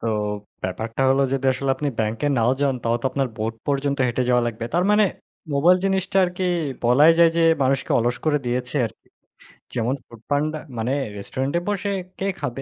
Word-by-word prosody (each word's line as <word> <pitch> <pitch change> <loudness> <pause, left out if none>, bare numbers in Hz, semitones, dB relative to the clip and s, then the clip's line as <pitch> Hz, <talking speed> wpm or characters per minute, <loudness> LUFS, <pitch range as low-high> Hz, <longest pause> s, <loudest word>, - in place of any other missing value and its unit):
তো 115 - -4 0.6
ব্যাপারটা 110 +7 -3
হল 135 +1 +3
যদি 135 0 0
আসলে 135 +1 -2
আপনি 150 - -1
ব্যাংকে 110 +6 -1
নাও 115 +1 +3
যান, 140 -2 +2
তাহলেও 120 +1 0
তো - - +1
আপনার 135 -2 0
বোট 110 +1 -2
পর্যন্ত 140 0 0
হেঁটে 120 +1 0
যাওয়া 125 -1 +3
লাগবে। 115 0 -4
তার 175 +2 +3
মানে 210 0 +5 0.5
মোবাইল 170 +6 +5
জিনিসটা 195 0 0
আরকি 180 +1 -3 0.4
বলাই 145 +7 +6
যায় 170 -1 +7
যে 170 - +3 0.2
মানুষকে 135 0 0
অলস 120 +1 0
করে 150 -2 +2
দিয়েছে 125 +3 -2
আরকি। 110 - -15 0.7
যেমন 120 +2 0
ফুড 115 -2 -15
পান্ডা, 150 +2 0 0.2
মানে 115 +3 -1 0.3
রেস্টুরেন্টে 135 +10 -2
বসে 200 0 -1 0.3
কে 195 - -2
খাবে? 135 -3 -4
135 Hz, 180 wpm, -23 LUFS, 120-155 Hz, 0.7 s, যায়